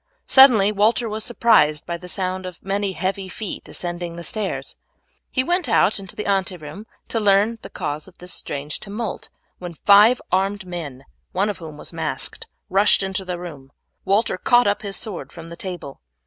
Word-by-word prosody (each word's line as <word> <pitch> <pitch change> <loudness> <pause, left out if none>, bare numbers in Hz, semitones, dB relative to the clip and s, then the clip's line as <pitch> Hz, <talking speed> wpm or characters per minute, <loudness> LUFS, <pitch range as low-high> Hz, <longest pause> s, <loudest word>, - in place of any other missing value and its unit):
Suddenly 235 -7 +7
Walter 220 +3 +2
was 215 0 -3
surprised 190 -11 +3
by 170 - -3
the 180 +1 -9
sound 185 0 -2
of 180 -2 -10
many 195 0 -1
heavy 190 +1 -2
feet 210 +2 -6
ascending 175 -1 -4
the 170 - -7
stairs. 215 -1 -3 0.5
He 255 - +1
went 350 -1 0
out 215 -2 +3
into 195 -1 -6
the 210 - -4
ante 190 -2 +1
room 155 +8 -10 0.2
to 225 - 0
learn 210 +2 +3
the - - -9
cause 150 +3 -4
of 185 - -17
this 180 +1 -8
strange 145 +1 -4
tumult, 210 +1 -5 0.3
when 175 -2 -7
five 210 +8 +6
armed 195 +2 0
men, 150 -7 -7 0.3
one 200 +3 +1
of 200 - -10
whom 155 -3 -9
was 150 - -10
masked, 160 -1 -3 0.2
rushed 195 +1 +4
into 190 0 -2
the 180 -1 -4
room. 150 -6 -9 0.3
Walter 200 -1 +1
caught 245 0 +4
up 205 0 +1
his 200 -2 -3
sword 210 -6 -6
from 165 0 -10
the 170 - -8
table. 175 - -7
195 Hz, 185 wpm, -22 LUFS, 175-210 Hz, 0.5 s, Suddenly